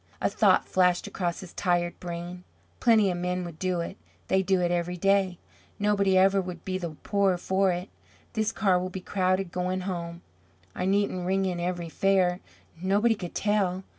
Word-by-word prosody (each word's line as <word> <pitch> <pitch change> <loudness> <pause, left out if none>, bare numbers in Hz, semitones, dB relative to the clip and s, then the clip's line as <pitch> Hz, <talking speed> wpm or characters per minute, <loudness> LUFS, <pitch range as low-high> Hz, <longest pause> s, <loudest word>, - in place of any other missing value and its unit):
A - - 0
thought - - +3
flashed 180 -1 +2
across 175 -3 -3
his 185 - -11
tired 175 -2 0
brain. 175 +1 -6 0.4
"Plenty 220 -5 +4
of 175 - -3
men 180 0 -2
would 165 -2 -9
do 185 -2 0
it; 170 - -6 0.3
they 190 - +3
do 190 0 +2
it 175 -1 +1
every 175 0 -1
day. 195 -1 +2 0.4
Nobody 200 -2 +2
ever 195 +1 +4
would 180 -2 -8
be 185 -1 -2
the 170 -4 -5
poorer 200 -3 +2
for 190 +1 +1
it. 180 +2 -3 0.5
This 220 0 0
car 195 -5 +2
will 185 +1 -3
be 190 - -6
crowded 185 -1 0
going 180 +1 -2
home. 170 -2 -5 0.5
I - - -3
needn't 190 -2 0
ring 190 +1 +1
in 180 -2 -2
every 175 -1 -2
fare; 185 0 +2 0.4
nobody 205 +5 +3
could 180 -5 -7
tell. 195 -3 0
185 Hz, 180 wpm, -27 LUFS, 175-195 Hz, 0.5 s, Plenty